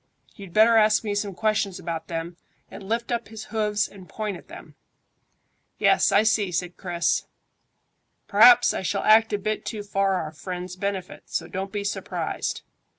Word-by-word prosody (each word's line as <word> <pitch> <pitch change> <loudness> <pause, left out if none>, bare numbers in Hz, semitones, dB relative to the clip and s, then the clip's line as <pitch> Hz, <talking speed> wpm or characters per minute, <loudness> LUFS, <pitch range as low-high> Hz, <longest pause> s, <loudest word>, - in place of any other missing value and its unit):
You'd 195 -3 -11
better 225 +4 +5
ask 215 0 +4
me 210 -2 -2
some 205 -2 -3
questions 215 -2 0
about 165 -1 -5
them, 165 +1 -5 0.4
and - - -9
lift 235 +2 -2
up 235 -1 -2
his 220 -1 -9
hoofs 210 -1 +1
and 185 -3 -15
point 210 -3 -4
at - - -13
them." - - -12 1.0
"Yes, - - +3
I 205 - +5
see," 215 -3 +1
said 175 0 -3
Chris. 175 -2 -1 1.0
"P'r'aps 365 -1 +7
I - - -3
shall 185 - -2
act 220 +1 +5
a 205 - +1
bit 215 +2 -3
too 215 -3 -5
for 195 -1 0
our 160 -4 -3
friends' 180 +3 -6
benefit, 190 -1 -4
so 170 - -3
don't 190 +2 -5
be 205 -1 -3
surprised. 200 - -3
200 Hz, 170 wpm, -24 LUFS, 180-215 Hz, 1.0 s, P'r'aps